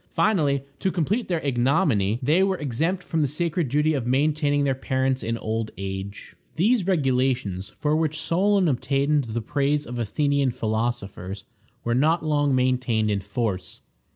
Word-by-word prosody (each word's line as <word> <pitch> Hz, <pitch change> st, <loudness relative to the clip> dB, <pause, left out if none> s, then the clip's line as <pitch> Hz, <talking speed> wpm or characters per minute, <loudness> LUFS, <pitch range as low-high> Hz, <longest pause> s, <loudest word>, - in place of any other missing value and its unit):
Finally, 145 Hz, -10 st, +2 dB, 0.2 s
to 190 Hz, -, 0 dB
complete 190 Hz, +8 st, -1 dB
their 170 Hz, -3 st, -1 dB
ignominy, 125 Hz, -, +2 dB
they 155 Hz, +8 st, +3 dB
were 190 Hz, -1 st, +2 dB
exempt 160 Hz, +6 st, -1 dB
from 165 Hz, -3 st, -1 dB
the 145 Hz, -, +2 dB
sacred 165 Hz, +1 st, -1 dB
duty 150 Hz, +4 st, +2 dB
of 130 Hz, -5 st, -2 dB
maintaining 145 Hz, +2 st, +2 dB
their 135 Hz, -1 st, +2 dB
parents 130 Hz, 0 st, -1 dB
in 115 Hz, +1 st, -2 dB
old 110 Hz, 0 st, -3 dB
age. 95 Hz, +1 st, -6 dB, 0.2 s
These 200 Hz, +3 st, +2 dB
regulations, 130 Hz, -, 0 dB
for 150 Hz, 0 st, +1 dB
which 155 Hz, -1 st, 0 dB
Solon 195 Hz, +3 st, +2 dB
obtained 140 Hz, +1 st, +1 dB
the 115 Hz, +1 st, -3 dB
praise 145 Hz, +5 st, 0 dB
of 120 Hz, 0 st, -6 dB
Athenian 140 Hz, +4 st, +1 dB
philosophers, 110 Hz, -4 st, -3 dB, 0.4 s
were 120 Hz, -, 0 dB
not 155 Hz, +6 st, +2 dB
long 145 Hz, -3 st, +2 dB
maintained 125 Hz, -4 st, +1 dB
in 100 Hz, -, 0 dB
force. 100 Hz, -2 st, -4 dB
140 Hz, 155 wpm, -24 LUFS, 120-155 Hz, 0.4 s, they